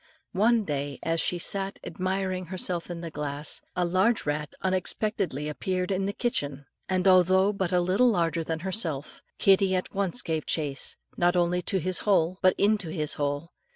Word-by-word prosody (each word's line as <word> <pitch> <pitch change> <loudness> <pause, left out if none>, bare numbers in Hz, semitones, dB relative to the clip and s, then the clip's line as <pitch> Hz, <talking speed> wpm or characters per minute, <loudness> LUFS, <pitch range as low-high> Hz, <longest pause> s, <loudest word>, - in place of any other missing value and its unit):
One 225 +3 +3
day 145 -4 -3
as 165 0 0
she 180 - 0
sat 195 +2 +1
admiring 185 -1 -2
herself 180 -1 -3
in 170 -1 -5
the 165 -1 -6
glass, 150 0 -3
a 180 -1 +1
large 190 +6 +2
rat 150 0 -3
unexpectedly 185 -4 -1
appeared 180 +4 -2
in 190 0 0
the - - 0
kitchen; 145 - -2 0.2
and 185 0 +1
although 190 +2 +5
but 190 -3 -2
little 185 +7 +3
larger 170 -5 0
than 160 0 -3
himself, 170 -7 -2 0.2
Kittie 195 -1 +4
at 185 - -3
once 200 +5 -1
gave 160 -2 -2
chase, 145 -4 0 0.2
not 175 +1 +3
only 175 0 +2
to 195 - 0
his 185 +1 0
hole, 185 -3 +2
but 185 -1 +4
into 205 -4 +2
his 155 -2 0
hole. 145 +3 -3
180 Hz, 170 wpm, -27 LUFS, 160-190 Hz, 0.2 s, although